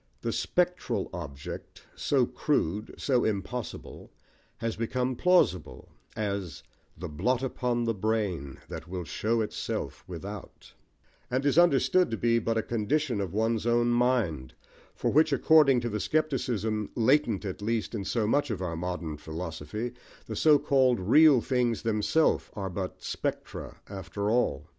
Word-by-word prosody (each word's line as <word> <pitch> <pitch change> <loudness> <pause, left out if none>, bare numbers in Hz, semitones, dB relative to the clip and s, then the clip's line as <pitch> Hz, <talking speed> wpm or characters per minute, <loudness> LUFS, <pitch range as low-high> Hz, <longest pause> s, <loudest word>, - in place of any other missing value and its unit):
The - - -1
spectral 175 - 0
object, 75 -6 -8
so 135 -4 +2
crude, 110 - -1
so 130 -3 +1
impossible, 110 +3 -4 0.5
has 115 0 -2
become 125 +3 -1
plausible, 175 - +2 0.3
as 100 -7 -3 0.3
The 90 +3 -5
blot 120 - 0
upon 125 -2 -1
the 115 -1 +1
brain, 100 -10 -2
That 80 +1 -7
will 90 0 -4
show 110 +8 0
itself 105 - -4
without; 95 +3 -9 0.6
and 130 +2 -1
is 140 - +3
understood 175 +2 +4
to 115 - -2
be 115 +1 +2
but 115 0 -1
a 110 - +1
condition 120 +1 0
of 95 -4 -3
one's 110 +2 0
own 120 0 +3
mind, 115 - +1 0.4
for - - 0
which, 155 +2 +4
according 140 -2 +5
to 120 - -2
the 105 -1 -2
scepticism, 120 -8 -1
latent 120 -3 +2
at 95 0 -5
least, 115 +1 -1
in 105 -4 -3
so 110 +2 0
much 145 +6 +1
of 110 - -2
our 90 -3 -3
modern 85 -2 -4
philosophy, 80 +8 -5 0.3
the - - -6
so 150 -2 +5
called 135 -4 +3
real 135 - +6
things 125 -3 0
themselves 115 +8 +2
are 95 -3 -4
but 95 0 -5
spectra - - -4
after 100 +1 -3
all. 110 - +1
115 Hz, 145 wpm, -28 LUFS, 95-130 Hz, 0.6 s, real